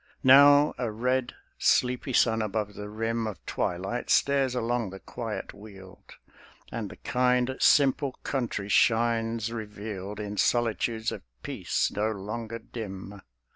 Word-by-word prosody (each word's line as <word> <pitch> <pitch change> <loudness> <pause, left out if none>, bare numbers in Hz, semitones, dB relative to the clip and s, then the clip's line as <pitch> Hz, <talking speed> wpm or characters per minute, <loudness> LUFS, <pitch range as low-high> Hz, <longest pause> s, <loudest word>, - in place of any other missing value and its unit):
Now 145 +2 +7
a 120 -3 -1
red, 125 +3 -1 0.2
sleepy 125 +1 +2
sun 110 -2 +3
above 105 -1 -2
the 105 0 -7
rim 115 +1 -2
Of 105 -5 -8
twilight 95 +7 -3
stares 135 -2 +3
along 120 -2 -1
the 95 +1 -9
quiet 115 +1 -6
weald, 95 -3 -14 0.6
And - - -4
the - - -10
kind, 125 +1 +1
simple 140 -1 +4
country 120 -7 -2
shines 115 +1 +2
revealed 105 -2 -6
In 105 -1 -5
solitudes 115 -1 +1
of - - -6 0.2
peace, - - -1
no 105 +2 0
longer 110 +2 -5
dim. 105 -3 -8
115 Hz, 130 wpm, -27 LUFS, 105-125 Hz, 0.6 s, Now